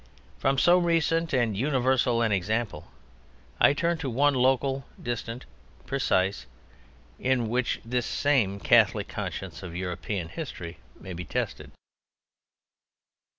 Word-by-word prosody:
From 135 +1 +1
so 175 +7 +5
recent 165 -1 +1
and 120 -5 +1
universal 130 -1 +2
an 110 - +1
example 100 -3 -1 0.7
I 145 - +6
turn 170 +2 0
to 140 - -3
one 140 +4 +3
local, 135 +1 +2 0.2
distant, 120 0 -4 0.4
precise, 95 - 0 0.7
in 125 -3 +1
which 120 +1 0
this 120 0 -1
same 115 -9 +1
Catholic - - +4
Conscience - - -5
of 90 -3 -8
European 90 0 -3
history 90 - -7 0.2
may 95 - -8
be 90 +1 -5
tested. 75 - -3
120 Hz, 115 wpm, -27 LUFS, 100-140 Hz, 0.7 s, I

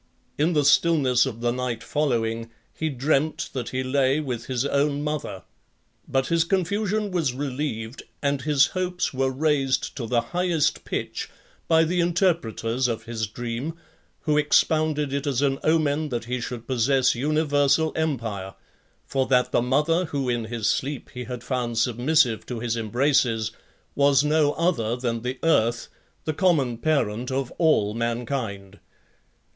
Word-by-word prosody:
In 160 +4 +2
the 150 -2 +2
stillness 140 -5 +4
of 115 -3 -6
the 120 0 +1
night 125 -2 -3
following, 115 -6 -1 0.2
he 160 - -2
dreamt 145 +3 0
that 125 -4 -3
he 130 0 -2
lay 135 +2 +2
with 125 -6 -4
his 130 0 -1
own 140 +1 +1
mother; 150 - -4 0.6
but 135 0 +1
his 165 +2 +2
confusion 200 +3 0
was 160 -9 0
relieved, 130 -4 -4 0.2
and 140 -1 0
his 145 -1 +4
hopes 180 -2 -1
were 135 0 +1
raised 135 -1 0
to 120 -4 -4
the 120 0 +2
highest 175 +3 0
pitch, - - -4 0.4
by 160 -1 +5
the 175 +3 0
interpreters 165 - +1
of 115 -2 -3
his 110 -2 -3
dream, 120 +8 -4 0.5
who 150 -1 +2
expounded 150 -1 +2
it 140 +1 -2
as 140 -1 +1
an 135 -1 +1
omen 155 -1 +1
that 120 -3 -3
he 125 +1 -3
should 120 -1 -6
possess 130 +1 +2
universal 145 +2 +2
empire; 115 -12 -2 0.5
for 135 -1 0
(6) - - -13
that 125 -1 +3
the - - +3
mother 150 +8 +2
who 140 -4 -3
in 120 -2 -1
his 115 -1 -4
sleep 140 0 -2
he 125 -1 -6
had 125 0 -6
found 120 -3 -2
submissive 125 +1 +2
to 120 -2 -4
his 115 0 -1
embraces, 115 -1 +1 0.4
was 140 -1 +4
no 150 -1 +3
other 120 -10 0
than 120 -2 -2
the 125 +2 -3
earth, 120 -7 +2 0.4
the 155 - -1
common 145 - +1
parent 125 -5 0
of 130 -1 -2
all 130 -11 +3
mankind. 115 -4 -3
135 Hz, 155 wpm, -24 LUFS, 120-155 Hz, 0.6 s, by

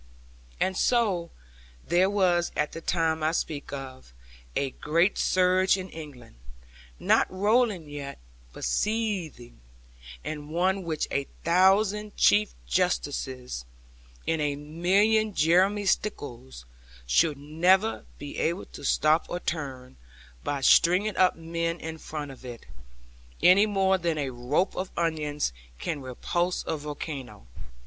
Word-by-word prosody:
And 190 - +1
so 200 -7 +1 0.6
there 180 +2 +3
was 180 -4 +2
at 150 - 0
the 165 - -7
time 160 -2 0
I 155 +1 +2
speak 150 -3 -3
of, 130 - -8 0.4
a 135 -1 0
great 170 +9 +1
surge 185 +1 +3
in 185 -1 -7
England, 140 - -11 0.6
not - - +3
rolling 205 -2 +1
yet, 145 -1 -7 0.3
but - - -10
seething; 175 - -2 0.6
and 150 -1 -6
one 185 +4 +1
which 160 -4 -2
a 140 0 -1 0.2
thousand 195 +4 +3
Chief 105 -5 +4
Justices, 65 - -1 0.6
and 165 -1 +1
a 145 -1 0
million 190 +8 +2
Jeremy 185 +6 +3
Stickles, 120 - -3 0.4
should 140 - +3
never 180 +9 +2
be 145 0 -7
able 170 +4 -1
to - - -12
stop 155 +3 +2
or 175 - -3
turn, 135 - -5 0.5
by 140 -1 -2
stringing 185 +9 +4
up 185 -1 +4
men 165 +1 -3
in 160 0 -6
front 150 -3 -6
of 130 - -14
it; 120 -2 -9 0.8
any 200 +4 +7
more 190 -2 +2
than 170 -2 -1
a 140 -3 -2
rope 125 +10 0
of 185 0 -3
onions 150 - -1 0.2
can 145 - -4
repulse 175 +8 -2
a - - -1
volcano. 145 - -7
165 Hz, 125 wpm, -27 LUFS, 145-185 Hz, 0.8 s, any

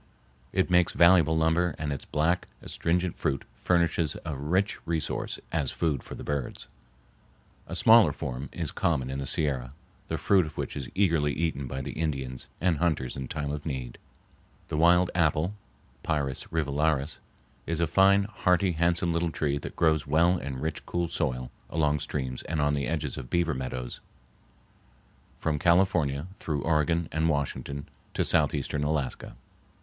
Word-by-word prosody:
It 95 -1 +1
makes 90 -1 +4
valuable 85 -2 +5
lumber 80 +1 +2
and 75 -2 -2
its 70 - -6
black, 85 +4 0 0.2
astringent 90 +1 -1
fruit 70 - -1
furnishes 85 -3 +1
a 80 - -3
rich 90 +10 0
resource 80 -3 -2
as 75 -5 0
food 75 -6 -1
for - - -9
the - - -8
birds. 70 -3 -4 1.0
A - - -5
smaller 110 -8 +7
form 65 0 -5
is - - -3
common 65 -6 0
in 65 - -3
the 70 - -4
Sierra, 65 -5 -1 0.3
the - - -2
fruit 95 -5 +3
of 75 - -11
which - - -3
is 70 -4 -5
eagerly 85 -7 +2
eaten 75 -4 -2
by 65 +1 -4
the - - -4
Indians 65 -5 -3
and 85 -1 +2
hunters 80 -7 0
in 65 -1 -5
time 75 -1 -3
of 75 0 -4
need. 65 -6 -5 0.7
The - - -2
wild 90 +2 +5
apple 80 +2 +2 0.5
(Pyrus 70 -5 -1
rivularis) 75 -1 0 0.5
is 85 -1 -1
a 85 - +3
fine, 95 +4 +5
hearty, 95 -2 +1
handsome 85 +1 +1
little 85 0 +1
tree 70 -2 -1
that - - -7
grows 80 -3 +2
well 85 +5 +4
in 70 -1 -5
rich, 80 +2 -3
cool 85 -1 -1
soil 65 -1 -1 0.2
along 75 -2 +1
streams 65 -3 -3
and 80 -1 -1
on 75 0 +2
the 70 -1 -1
edges 75 -4 -2
of 60 -2 -8
beaver 85 -2 +1
meadows 65 -2 -5 1.4
from 75 -2 -1
California 85 -4 +3
through 75 -3 -2
Oregon 80 +1 +1
and 80 +1 +1
Washington 70 -1 -2 0.3
to - - +1
southeastern 75 0 +1
Alaska. 75 -3 -2
80 Hz, 160 wpm, -28 LUFS, 70-85 Hz, 1.4 s, smaller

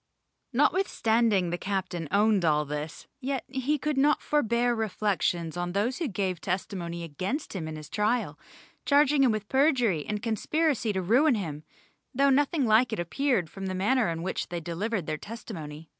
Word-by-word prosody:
Notwithstanding 230 - +2
the 175 - -2
captain 185 -4 -3
owned 205 +1 +3
all 150 -2 +2
this, 150 +2 -5
yet 270 -1 -2
he 270 +3 -1
could 295 -1 -1
not 295 +2 +4
forbear 240 -4 +1
reflections 195 -6 -1
on 175 0 -3
those 225 - 0
who 335 - -1
gave 190 -5 -2
testimony 175 -2 -3
against 185 - -4
him 165 -4 -3
at 155 0 -6
his 155 -1 -9
trial, 210 -7 -1 0.4
charging 285 0 +4
them 260 -3 +5
with 215 -1 -3
perjury 255 - +2
and 210 -1 -3
conspiracy 245 - 0
to 190 -1 -1
ruin 250 - +4
him, 155 -7 -4 0.5
though 275 +1 +4
nothing 285 +1 +2
like 225 +3 +4
it 220 - -2
appeared 215 - 0
from 195 +4 -7
the 185 - -3
manner 220 +3 +2
in 165 0 -3
which 190 - -3
they 175 0 -3
delivered 175 +4 -3
their 155 -1 -2
testimony. 160 -9 -8
210 Hz, 170 wpm, -28 LUFS, 175-260 Hz, 0.5 s, them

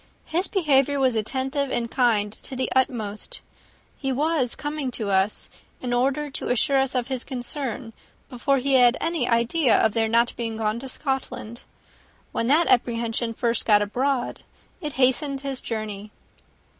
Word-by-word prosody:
His 350 +4 0
behaviour 285 - +2
was 260 -3 +2
attentive 265 +5 -1
and 235 -2 -2
kind 220 -5 +2
to 260 - -9
the 260 0 -2
utmost. 240 - -1 0.5
He 270 -2 -3
was 285 -2 0
coming 295 -2 -3
to 220 -5 -3
us, 190 +2 +1 0.3
in 245 -1 -3
order 275 +4 +1
to - - -4
assure 270 +3 +3
us 265 0 0
of 245 -2 0
his 260 -2 -2
concern, 250 -2 -5 0.3
before 275 +2 0
he 270 +1 0
had 250 -1 +6
any 330 -7 -1
idea 235 +3 +3
of 220 - +3
their 225 -1 +2
not 235 +1 +2
being 225 -2 -3
gone 220 +1 -1
to 265 +1 -8
Scotland: 265 -4 -4 0.7
when 230 - -1
that 310 +6 +4
apprehension 235 -2 +1
first 235 -1 +1
got 210 -2 +5
abroad, 250 +5 -1 0.4
it 300 -3 -4
hastened 270 +2 +2
his 275 -2 -4
journey." 215 -2 -5
255 Hz, 155 wpm, -24 LUFS, 230-275 Hz, 0.7 s, had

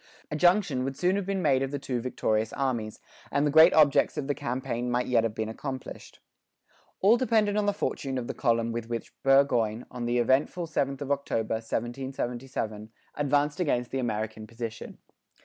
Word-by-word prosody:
A - - -1
junction 175 -5 +3
would 135 0 -4
soon 180 +2 +2
have 200 -2 -2
been 195 -2 -1
made 135 -4 +3
of 135 - -1
the 145 - -3
two 130 -3 -3
victorious 110 -3 -1
armies, 120 -6 -2 0.3
and 145 +1 +2
the 145 - +1
great 160 +4 +8
objects 150 0 +4
of 150 - -2
the 145 - 0
campaign 125 -3 -3
might 120 +1 0
yet 120 -3 +2
have 110 -2 -2
been 110 -1 -2
accomplished. 130 +4 -7 0.8
All 215 +5 +6
depended 220 -5 +2
on 210 -1 +1
the - - +4
fortune 135 -9 -3
of 125 - -3
the - - -4
column 115 -2 +1
with 115 0 -5
which 115 -1 -5
Burgoyne, 125 -5 +3
on 120 -1 -4
the 120 +1 +1
eventful 130 +8 +1
7th 140 -4 -2
of 140 0 -3
October, 125 -6 -1
1777, 120 -2 -4 0.2
advanced 145 +3 +1
against 125 -8 0
the 135 - -1
American 110 -2 -3
position. 115 -1 -7
130 Hz, 185 wpm, -28 LUFS, 115-145 Hz, 0.8 s, great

